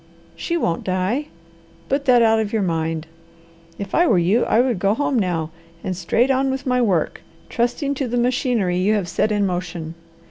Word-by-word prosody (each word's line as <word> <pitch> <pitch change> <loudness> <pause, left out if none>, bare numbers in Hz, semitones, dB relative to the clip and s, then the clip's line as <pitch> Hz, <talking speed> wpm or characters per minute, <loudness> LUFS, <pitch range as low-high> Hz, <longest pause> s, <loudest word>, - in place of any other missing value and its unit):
She 340 - -2
won't 170 - -1
die; 190 +10 -1 0.6
put 275 +1 -1
that 245 -3 +5
out 225 0 +4
of 215 -2 -2
your 220 -3 0
mind. 160 -2 -2 0.7
If 200 -1 -7
I 345 +1 +4
were 205 - +4
you 185 +8 +2
I 225 - +2
would 245 -5 +1
go 195 +3 +2
home 275 -1 0
now 165 -5 -1 0.3
and 185 - -2
go - - -6
straight 225 +9 +1
on 265 +1 +1
with 265 +1 -3
my 250 -1 +2
work, 185 -9 0 0.3
trusting 245 +4 -1
to 270 -1 -3
the 245 +1 -2
machinery 240 -7 +1
you 200 +4 +2
have 200 -4 -1
set 210 +5 0
in 205 -1 +1
motion. 175 -3 -4
215 Hz, 200 wpm, -21 LUFS, 180-250 Hz, 0.7 s, that